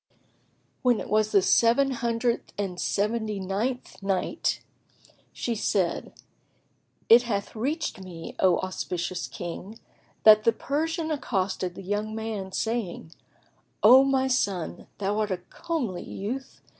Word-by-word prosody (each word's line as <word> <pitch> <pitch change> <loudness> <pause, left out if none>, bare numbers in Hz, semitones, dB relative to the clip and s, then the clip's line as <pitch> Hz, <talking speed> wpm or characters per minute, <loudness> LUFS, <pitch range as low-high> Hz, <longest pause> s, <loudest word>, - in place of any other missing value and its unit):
y. - - -35 0.7
When 245 -3 +3
it - - -7
was 215 0 +2
the 195 - +4
Seven 235 +8 +4
Hundred 235 -1 -1
and 190 -3 -3
Seventy 215 0 -1
ninth 210 +8 -3
Night, 195 - -1 0.7
She 240 - -2
said, 200 -5 0 1.0
It 230 +2 +8
hath 210 -4 -3
reached 275 - -2
me, 170 -3 -8
O 185 -2 +4
auspicious 180 -4 -3
King, 175 - -7 0.5
that 215 -1 +8
the 230 - +4
Persian 320 +5 -2
accosted 190 - -1
the - - -8
young 210 +3 -2
man 220 -4 -4
saying, 220 -7 -3 0.7
"O 255 +5 +9
my 265 -1 +2
son, 200 -9 -1
thou 205 +1 -1
art 215 -1 0
a 185 - -1
comely 230 - -4
youth! 255 +7 -6
215 Hz, 130 wpm, -27 LUFS, 190-245 Hz, 1.0 s, O